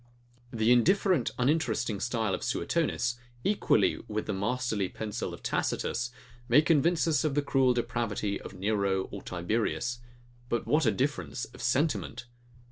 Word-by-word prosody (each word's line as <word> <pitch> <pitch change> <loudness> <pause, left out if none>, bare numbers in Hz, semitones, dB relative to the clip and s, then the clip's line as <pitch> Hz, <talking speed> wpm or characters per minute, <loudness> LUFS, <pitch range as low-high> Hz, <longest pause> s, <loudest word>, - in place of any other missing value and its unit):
The 115 -1 +2
indifferent, 175 - +4
uninteresting 125 -6 +1
style 115 -4 -1
of - - -2
Suetonius, 120 0 0 0.2
equally 205 +1 +2
with 110 0 -3
the 105 - -2
masterly 110 -1 -1
pencil 110 -2 -4
of - - -10
Tacitus, 120 0 -1 0.4
may 140 +6 +6
convince 165 +2 +3
us 155 -2 +2
of 150 -3 0
the 145 - +2
cruel 130 -3 +3
depravity 110 -4 -2
of - - -9
Nero 100 -1 0
or 100 - -6
Tiberius: 115 +7 -2 0.5
But 120 - -1
what 150 -3 +2
a - - +5
difference 130 +2 -2
of - - -13
sentiment! 120 - 0
120 Hz, 140 wpm, -29 LUFS, 105-140 Hz, 0.5 s, may